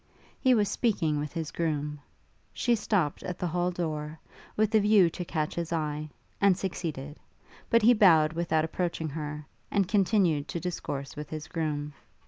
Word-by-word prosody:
He 260 -2 +4
was 210 -2 +2
speaking 180 -9 0
with 150 0 -4
his 165 -3 -4
groom. 150 -3 -2 0.5
She 240 - +1
stopt 205 -9 0
at 180 - -5
the 180 - -3
hall 175 +1 0
door, 155 -3 -4 0.4
with 215 +1 +2
a 220 - +6
view 205 -4 +5
to 180 - -5
catch 155 -3 -2
his 170 -1 -4
eye, 155 -2 -2 0.3
and 200 -3 +5
succeeded; 155 -7 -4 0.5
but 230 -1 +4
he 240 +3 +7
bowed 165 -8 +5
without 160 -2 +1
approaching 165 -1 -2
her, 150 0 -5 0.2
and 195 -3 +1
continued 185 -7 +2
to 170 - -3
discourse 145 -6 -4
with 150 0 -7
his 155 +1 -6
groom. 150 -3 -3
165 Hz, 165 wpm, -28 LUFS, 150-190 Hz, 0.5 s, he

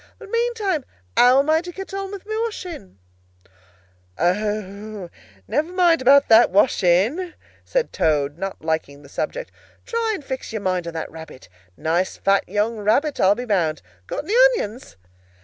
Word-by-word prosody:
But 400 - -13
meantime, 455 - 0 0.3
how 250 +2 +6
am 275 +2 +3
I 320 +1 +3
to 355 0 -8
get 385 +2 -8
on 390 0 -4
with 400 -1 -8
my 435 +1 -4
washing?" 360 - -7 1.2
"O, 205 +1 -2 0.4
never 315 +4 -1
mind 350 -4 +3
about 275 +2 +6
the 225 +1 +7
washing," 205 - +2 0.3
said - - -1
Toad, 145 -2 +1
not 195 -4 -5
liking 145 -3 -2
the 140 - -15
subject. - - -4 0.3
"Try 460 -2 -1
and 300 - -9
fix 260 -2 -5
your 220 -2 -4
mind 185 -2 -1
on 170 - -5
that 160 - -4
rabbit. 160 - -11 0.3
A - - -21
nice 170 +4 0
fat 195 -2 +1
young 210 +3 0
rabbit, 250 +9 +1
I'll 190 +2 +5
be 245 - -5
bound. 165 - 0 0.2
Got - - -4
any 400 - -3 0.2
onions?" 225 - -6
225 Hz, 165 wpm, -22 LUFS, -, 1.2 s, the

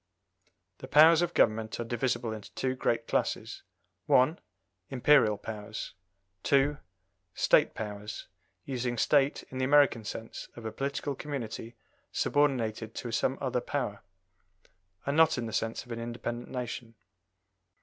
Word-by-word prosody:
The - - -8
powers 160 +2 +7
of 175 -1 -1
government 110 0 +2
are - - -1
divisible 120 -1 -1
into 105 -2 -9
two 130 -1 0
great 115 -2 -1
classes - - -1 0.5
1. 130 +7 +4 0.5
Imperial 130 -5 +4
powers; 110 0 -6 0.5
2. 140 +4 +2 0.6
State - - +4
powers, 105 -1 -6 0.4
using 125 -2 -2
"State" 140 +4 +3
in 130 - -5
the 130 - +1
American 140 -4 +4
sense 110 +2 -7
of 115 - -10
a 110 - -3
political 140 +4 -3
community 130 -5 -6 0.4
subordinated 115 -6 0
to 120 - -5
some 130 +4 0
other 130 -2 0
power, 120 -9 -3 1.0
and 140 - 0
not 160 -2 +5
in 120 - -2
the 110 - -6
sense 115 0 -2
of 120 - -12
an 115 - -4
independent 120 +1 -5
nation. 120 -2 -5
120 Hz, 135 wpm, -30 LUFS, 110-140 Hz, 1.0 s, powers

